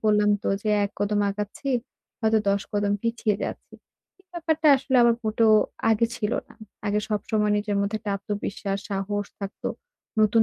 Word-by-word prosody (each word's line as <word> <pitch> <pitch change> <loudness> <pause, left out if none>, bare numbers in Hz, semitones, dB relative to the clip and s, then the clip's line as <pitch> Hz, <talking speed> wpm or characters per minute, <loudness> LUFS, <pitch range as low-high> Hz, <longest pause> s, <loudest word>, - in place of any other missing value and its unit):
বললাম 210 -1 +4
তো - - -1
যে, 215 - 0
১ 200 - -3
কদম 205 0 +1
আগাচ্ছি, 210 +7 -5 0.5
হয়তো 220 0 +3
১০ 200 0 +2
কদম 205 0 +1
পিছিয়ে 230 -3 0
যাচ্ছি। - - -7 0.5
এই 380 - -27
ব্যাপারটা 320 -2 +1
আসলে 265 0 0
আমার 235 -1 +5
মোটেও 220 0 +4 0.4
আগে 225 +1 +3
ছিল 210 +1 -1 0.2
না। - - -16 0.3
আগে 205 +1 +1
সবসময় 210 0 +1
নিজের 205 0 -1
মধ্যে 200 +2 0
একটা 210 -2 -4
আত্মবিশ্বাস 200 0 -3
সাহস 200 +1 -2
থাকতো। 195 0 -4 0.5
নতুন 215 +1 +5
210 Hz, 160 wpm, -25 LUFS, 205-225 Hz, 0.5 s, আমার